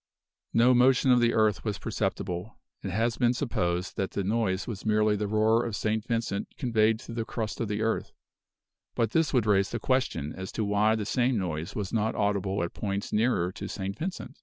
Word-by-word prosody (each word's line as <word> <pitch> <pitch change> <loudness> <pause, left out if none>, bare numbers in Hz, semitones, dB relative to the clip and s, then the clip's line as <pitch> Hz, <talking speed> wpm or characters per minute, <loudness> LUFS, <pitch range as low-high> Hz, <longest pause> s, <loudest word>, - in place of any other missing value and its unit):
No 120 +2 +5
motion 125 +1 +4
of 125 - +6
the 120 0 +2
earth 110 -1 +2
was 105 -3 -2
perceptible. 90 +6 -3 0.2
It 95 - -4
has 115 +5 0
been 120 -1 +2
supposed 90 -9 -1
that 95 - -1
the 100 - -3
noise 100 -2 0
was 110 -4 -6
merely 105 -1 +3
the 105 0 -2
roar 110 +2 +3
of 115 -3 -3
St. 110 0 -1
Vincent 115 -4 -1
conveyed 110 -4 +2
through 115 - -9
the 115 -1 -2
crust 110 0 -4
of 115 - -1
the 105 +1 -2
earth; 115 0 -1 0.8
but 115 -2 +1
this 160 0 +2
would 125 -5 +2
raise 100 -2 +3
the 120 - -3
question 120 - 0
as 95 0 -7
to 110 - -1
why 105 +2 +3
the 110 -2 -3
same 125 +2 +1
noise 85 -4 -3
was 100 -1 -4
not 110 -1 0
audible 100 -2 0
at 85 - -4
points 100 -1 -3
nearer 105 -6 +2
to - - -7
St. 100 0 -4
Vincent? 185 +3 -6
110 Hz, 205 wpm, -28 LUFS, 100-115 Hz, 0.8 s, of